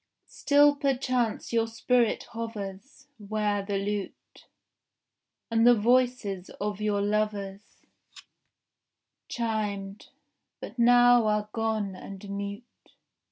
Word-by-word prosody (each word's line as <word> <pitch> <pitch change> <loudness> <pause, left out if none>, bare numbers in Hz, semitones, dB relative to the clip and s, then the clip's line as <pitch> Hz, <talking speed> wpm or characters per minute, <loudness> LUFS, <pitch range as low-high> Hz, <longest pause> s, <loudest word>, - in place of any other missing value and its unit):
Still 290 0 +3
perchance 255 -5 -1
your 230 -1 +2
spirit 235 +1 +1
hovers 225 +3 -7
Where 210 -1 -1
the 200 0 -2
lute 200 0 -5 1.0
And 230 +1 +4
the 245 - +8
voices 235 -4 +1
of 205 0 -3
your 205 -1 0
lovers 205 -1 -3 1.4
Chimed, 210 -4 -3 0.5
but 245 - -9
now 245 -1 +6
are 210 0 0
gone 220 -4 -1
and 195 +2 -10
mute. 200 +2 -5
215 Hz, 95 wpm, -27 LUFS, 200-240 Hz, 1.4 s, the